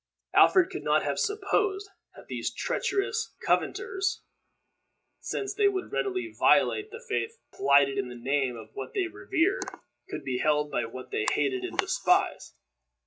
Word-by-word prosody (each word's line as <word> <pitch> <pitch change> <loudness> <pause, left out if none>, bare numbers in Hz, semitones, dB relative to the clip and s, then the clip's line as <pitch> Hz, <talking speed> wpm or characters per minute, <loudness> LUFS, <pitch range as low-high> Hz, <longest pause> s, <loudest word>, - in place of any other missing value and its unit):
Alfred 370 0 +6
could 375 - -5
not - - +2
have - - -1
supposed 410 -1 0 0.3
that - - -13
these - - -3
treacherous 455 -2 -1
covenanters, 385 +1 0 1.0
since 400 - -3
they 410 0 +3
would 380 -2 -2
readily 370 -3 -2
violate 420 0 +4
the 465 +2 -10
faith 450 +1 -2 0.2
plighted 140 -1 +4
in 130 -2 -2
the 125 - -8
name 130 0 0
of 110 -1 -11
what 135 - -7
they 390 - +1
revered, 355 +2 0 0.4
could - - -5
be 130 -2 -2
held 150 0 +1
by 120 - 0
what 130 +3 -9
they 110 - -1
hated 135 -3 0
and - - -5
despised. - - +1
355 Hz, 150 wpm, -28 LUFS, -, 1.0 s, Alfred